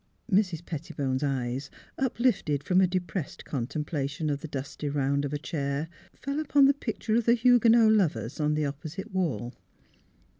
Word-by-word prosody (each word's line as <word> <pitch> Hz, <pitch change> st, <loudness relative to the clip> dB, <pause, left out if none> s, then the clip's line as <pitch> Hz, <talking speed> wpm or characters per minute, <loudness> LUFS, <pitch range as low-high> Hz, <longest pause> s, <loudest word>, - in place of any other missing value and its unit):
" -, -, -19 dB
Mrs. 175 Hz, -5 st, -3 dB
Pettibone 140 Hz, -4 st, -3 dB
's -, -, -4 dB
eyes, 135 Hz, 0 st, -2 dB, 0.3 s
uplifted 235 Hz, -, 0 dB
from 185 Hz, +4 st, +3 dB
a 185 Hz, -, +5 dB
depressed 180 Hz, -3 st, -4 dB
contemplation 145 Hz, +2 st, -2 dB
of 140 Hz, 0 st, -3 dB
the -, -, -6 dB
dusty 145 Hz, +1 st, -5 dB
round 140 Hz, 0 st, 0 dB
of 140 Hz, -, -4 dB
a 150 Hz, -, -1 dB
chair, 145 Hz, 0 st, -3 dB, 0.3 s
fell 280 Hz, +2 st, -3 dB
upon 285 Hz, -2 st, +4 dB
the 275 Hz, -, +6 dB
picture 225 Hz, -5 st, -3 dB
of 230 Hz, 0 st, +2 dB
the 235 Hz, -, +5 dB
Huguenot 235 Hz, -2 st, +5 dB
Lovers 150 Hz, -, +1 dB
on 150 Hz, 0 st, +1 dB
the 150 Hz, 0 st, 0 dB
opposite 155 Hz, +7 st, -6 dB
wall. 155 Hz, -10 st, -1 dB
155 Hz, 165 wpm, -28 LUFS, 140-215 Hz, 0.3 s, the